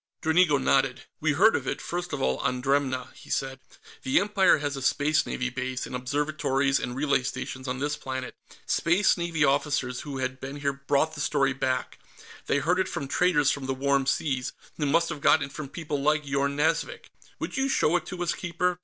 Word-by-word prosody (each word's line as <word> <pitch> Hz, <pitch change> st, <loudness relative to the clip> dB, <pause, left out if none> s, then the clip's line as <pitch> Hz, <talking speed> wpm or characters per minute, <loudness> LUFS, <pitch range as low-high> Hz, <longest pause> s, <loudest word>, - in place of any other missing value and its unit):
Dranigo 160 Hz, -2 st, +4 dB
nodded. 135 Hz, -1 st, +1 dB, 0.2 s
"We 155 Hz, -1 st, +1 dB
heard 195 Hz, +9 st, +5 dB
of -, -, -2 dB
it, -, -, -2 dB
first 175 Hz, 0 st, -4 dB
of -, -, -2 dB
all, 65 Hz, 0 st, +1 dB
on 125 Hz, 0 st, -1 dB
Dremna," 130 Hz, -1 st, 0 dB
he -, -, -15 dB
said. 135 Hz, 0 st, -2 dB, 0.4 s
"The 130 Hz, -, +3 dB
Empire 200 Hz, -1 st, +4 dB
has 145 Hz, -1 st, -3 dB
a 135 Hz, -, -5 dB
Space 145 Hz, +3 st, +2 dB
Navy 125 Hz, 0 st, -2 dB
base, 130 Hz, 0 st, -3 dB
and 125 Hz, -, -6 dB
observatories 140 Hz, +1 st, 0 dB
and 120 Hz, 0 st, -4 dB
relay 140 Hz, -1 st, +2 dB
stations, 130 Hz, +1 st, -5 dB
on 125 Hz, 0 st, -2 dB
this 145 Hz, +2 st, -1 dB
planet. 130 Hz, -1 st, -5 dB, 0.3 s
Space 175 Hz, +4 st, +3 dB
Navy 170 Hz, -3 st, 0 dB
officers 135 Hz, -3 st, 0 dB
who 145 Hz, -2 st, -6 dB
had 130 Hz, 0 st, -3 dB
been 135 Hz, +2 st, -6 dB
here 140 Hz, -1 st, -1 dB
brought 140 Hz, +3 st, 0 dB
the 150 Hz, -, -5 dB
story 135 Hz, -2 st, +2 dB
back; 130 Hz, -1 st, -2 dB, 0.5 s
they -, -, +2 dB
heard 170 Hz, +6 st, +1 dB
it 190 Hz, -, +1 dB
from 140 Hz, -, -4 dB
traders 150 Hz, -3 st, +3 dB
from 140 Hz, -2 st, -4 dB
the 135 Hz, -, -1 dB
Warm 140 Hz, 0 st, +1 dB
Seas, 130 Hz, -3 st, -1 dB, 0.2 s
who 150 Hz, -, 0 dB
must 165 Hz, +3 st, +2 dB
have 155 Hz, -4 st, -5 dB
gotten 150 Hz, 0 st, +4 dB
it 140 Hz, -, -12 dB
from 150 Hz, -3 st, -6 dB
people 150 Hz, -3 st, -4 dB
like 150 Hz, +1 st, +2 dB
Yorn 140 Hz, 0 st, 0 dB
Nazvik. 160 Hz, +2 st, -1 dB, 0.3 s
Would -, -, -5 dB
you 270 Hz, 0 st, +1 dB
show 175 Hz, -, +2 dB
it 175 Hz, -1 st, -1 dB
to 180 Hz, -1 st, -4 dB
us, 175 Hz, -, 0 dB
Keeper? 180 Hz, 0 st, -1 dB
140 Hz, 205 wpm, -27 LUFS, 130-160 Hz, 0.5 s, heard